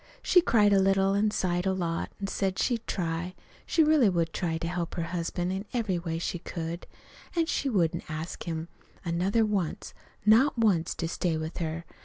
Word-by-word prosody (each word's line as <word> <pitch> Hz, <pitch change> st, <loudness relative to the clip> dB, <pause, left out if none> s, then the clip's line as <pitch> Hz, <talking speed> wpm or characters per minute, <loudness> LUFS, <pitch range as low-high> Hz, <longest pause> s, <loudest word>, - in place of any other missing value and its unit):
She 360 Hz, -, +6 dB
cried 210 Hz, -9 st, +4 dB
a 195 Hz, -, +5 dB
little, 195 Hz, 0 st, +3 dB
an' 205 Hz, +2 st, +2 dB
sighed 180 Hz, -3 st, 0 dB
a 190 Hz, -, +2 dB
lot, 170 Hz, -3 st, -2 dB
an' 200 Hz, -, -3 dB
said 195 Hz, -1 st, -1 dB
she'd 235 Hz, -3 st, 0 dB
try, 175 Hz, 0 st, -2 dB, 0.3 s
she 325 Hz, -, +4 dB
really 300 Hz, -8 st, +5 dB
would 170 Hz, -3 st, 0 dB
try 165 Hz, -2 st, -1 dB
to 165 Hz, -, -3 dB
help 175 Hz, -1 st, -3 dB
her 170 Hz, -, -1 dB
husband 175 Hz, +1 st, -2 dB
in 195 Hz, +2 st, -4 dB
every 215 Hz, -7 st, 0 dB
way 165 Hz, -1 st, -3 dB
she 175 Hz, +1 st, -3 dB
could; 165 Hz, 0 st, -5 dB, 0.5 s
an' 335 Hz, -1 st, +3 dB
she 280 Hz, -3 st, -1 dB
wouldn't 175 Hz, -9 st, 0 dB
ask 160 Hz, +2 st, -5 dB
him 165 Hz, -1 st, -3 dB, 0.4 s
another 185 Hz, +6 st, +2 dB
once, 200 Hz, -6 st, -2 dB, 0.3 s
not 235 Hz, +6 st, +5 dB
once, 195 Hz, -8 st, +2 dB
to 165 Hz, -, -2 dB
stay 165 Hz, -1 st, -1 dB
with 155 Hz, +1 st, -5 dB
her. 165 Hz, 0 st, -3 dB
180 Hz, 190 wpm, -28 LUFS, 165-205 Hz, 0.5 s, She